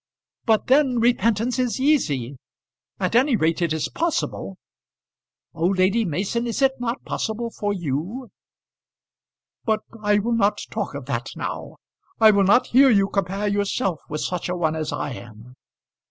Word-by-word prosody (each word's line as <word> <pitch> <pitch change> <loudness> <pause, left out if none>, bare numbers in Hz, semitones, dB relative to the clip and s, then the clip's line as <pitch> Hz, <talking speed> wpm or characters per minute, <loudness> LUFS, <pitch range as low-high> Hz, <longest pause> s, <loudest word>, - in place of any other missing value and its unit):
"But 220 -2 +2
then 265 -1 +3
repentance 230 +1 +1
is 250 0 0
easy; 145 - +1 0.6
at - - -1
any 255 +2 +4
rate 165 -2 +1
it 170 -2 +1
is 160 -1 -1
possible." 335 -1 -2 1.0
"Oh, 165 0 0
Lady 195 +4 +2
Mason, 200 +8 -2
is 235 +4 -1
it 270 - +5
not 240 +1 -3
possible 230 +1 -3
for 205 -2 -2
you?" 180 - -4 1.3
"But 220 -1 0 0.2
I 210 -1 +3
will 220 +4 -1
not 210 -2 +2
talk - - -3
of - - -6
that - - -3
now. - - -5 0.4
I 220 -1 +8
will 200 -1 +3
not 225 +6 +5
hear 270 +2 +7
you 200 -4 +3
compare 195 +1 -1
yourself 200 -3 -1
with 150 0 -3
such 180 -1 -3
a 180 - -1
one 160 -2 0
as 155 -1 -3
I - - -3
am. 120 0 -11
205 Hz, 155 wpm, -23 LUFS, 170-235 Hz, 1.3 s, I